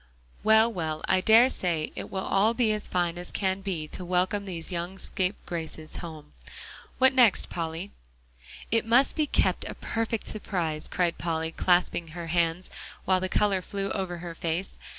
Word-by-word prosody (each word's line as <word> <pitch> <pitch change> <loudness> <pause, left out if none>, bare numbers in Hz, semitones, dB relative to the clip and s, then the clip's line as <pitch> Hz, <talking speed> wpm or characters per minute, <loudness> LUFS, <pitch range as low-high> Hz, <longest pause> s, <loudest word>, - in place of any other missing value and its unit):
"Well, 220 +1 +5
well, 160 -4 -3
I 185 - +3
dare 225 +5 +6
say 170 -10 -2
it - - -6
will 190 -1 -4
all 215 +4 +2
be 230 -3 +2
as 210 -1 0
fine 175 -1 -1
as 180 - -7
can 190 -1 -1
be 180 -6 -3
to - - -4
welcome 185 +3 0
these 175 -2 -5
young 175 +2 -4
scapegraces 175 -5 -4
home. 155 - -9 0.6
What 260 +1 +5
next, 245 -6 +4
Polly?" 165 +3 -4 0.8
"It 225 +1 +3
must 240 +5 +7
be 305 -1 +1
kept - - +1
a - - -6
perfect 225 -1 -3
surprise," 170 -7 -3
cried 175 -2 -1
Polly, 160 -1 -2
clasping 175 -1 +1
her 170 - -5
hands 170 +1 0 0.3
while 185 0 +3
the 185 0 -3
color 200 -2 +1
flew 195 +2 -4
over 185 -3 -3
her 170 0 -7
face. 165 +3 -4
185 Hz, 170 wpm, -27 LUFS, 170-205 Hz, 0.8 s, must